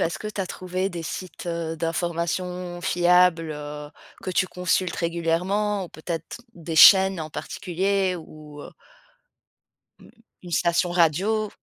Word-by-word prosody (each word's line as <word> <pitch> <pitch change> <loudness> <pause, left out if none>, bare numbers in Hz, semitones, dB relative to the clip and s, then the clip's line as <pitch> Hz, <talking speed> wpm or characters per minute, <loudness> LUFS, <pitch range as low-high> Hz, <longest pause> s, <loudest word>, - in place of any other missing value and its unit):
heu, - - +3
est-ce 165 - -3
que 215 - -7
tu 210 -1 -4
as 185 - -2
trouvé 185 +1 -3
des 170 -3 -6
sites, 185 +2 -7
heu, 165 -1 -3
d'informations 175 +2 -3
fiables, 175 -2 +3
heu, 150 0 -7 0.3
que 185 - -4
tu 185 +1 +1
consultes 180 0 -1
régulièrement 180 +5 0
ou 175 - -10
peut-être 165 +4 -6 0.2
des 165 -1 -6
chaînes 190 +1 +8
en 155 0 -6
particulier 190 +1 -1
ou 150 -2 -12
heu - - -10 1.3
Mmh, - - -17 0.3
une 175 - -10
station 170 +1 +1
radio? 185 +6 +2
175 Hz, 145 wpm, -24 LUFS, 165-185 Hz, 1.3 s, chaînes